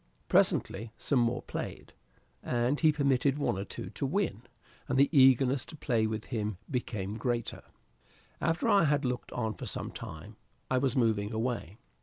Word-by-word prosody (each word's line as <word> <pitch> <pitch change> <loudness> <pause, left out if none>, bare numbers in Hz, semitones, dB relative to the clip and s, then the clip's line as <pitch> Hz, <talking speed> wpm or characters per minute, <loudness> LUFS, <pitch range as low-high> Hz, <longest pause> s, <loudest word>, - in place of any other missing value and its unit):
Presently 110 +3 +2
some 135 +2 +1
more 120 +1 +1
played, - - -6 0.5
and 125 +4 0
he 155 -2 +5
permitted 140 -1 +2
one 145 - 0
or - - -2
two - - -7
to - - -6
win, - - -1 0.5
and 130 - 0
the 140 +4 +4
eagerness 130 -1 +5
to 160 - -10
play 115 -7 +1
with 110 -1 -4
him 105 -5 -3
became 110 -5 -3
greater. 120 -1 -2 0.8
After 165 +1 +1
I 200 -4 +5
had 145 -1 +2
looked 125 0 -3
on 110 -3 -2
for - - -8
some - - -4
time, 100 +8 -9 0.3
I 130 - +3
was 130 -2 +1
moving 110 -4 +1
away. 110 -4 -3
125 Hz, 165 wpm, -30 LUFS, 110-135 Hz, 0.8 s, he